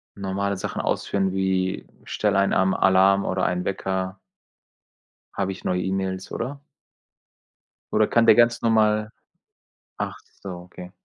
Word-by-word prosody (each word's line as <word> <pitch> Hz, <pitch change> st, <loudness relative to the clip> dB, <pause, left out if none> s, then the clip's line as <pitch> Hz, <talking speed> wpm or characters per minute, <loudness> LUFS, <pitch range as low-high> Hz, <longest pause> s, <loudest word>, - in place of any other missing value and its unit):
normale 100 Hz, 0 st, -2 dB
Sachen -, -, -4 dB
ausführen, 95 Hz, -1 st, -1 dB
wie: 95 Hz, -1 st, -1 dB, 0.2 s
„Stell 105 Hz, -2 st, -1 dB
einen 100 Hz, 0 st, +2 dB
Arm 95 Hz, 0 st, +3 dB
Alarm 95 Hz, +1 st, +4 dB
oder 95 Hz, -1 st, 0 dB
einen 90 Hz, 0 st, -1 dB
Wecker“ 95 Hz, -1 st, -2 dB, 1.2 s
„habe 95 Hz, -1 st, -2 dB
ich -, -, -11 dB
neue 90 Hz, 0 st, 0 dB
E-Mails“, 95 Hz, 0 st, -3 dB
oder? 140 Hz, +4 st, -5 dB, 1.3 s
Oder 110 Hz, 0 st, +3 dB
kann 115 Hz, -, +3 dB
der -, -, +8 dB
ganz 120 Hz, +1 st, +3 dB
normal 110 Hz, -1 st, +2 dB, 0.9 s
ach -, -, -3 dB, 0.3 s
so, 100 Hz, -, -7 dB
okay. 90 Hz, 0 st, -10 dB
95 Hz, 130 wpm, -24 LUFS, 95-105 Hz, 1.3 s, der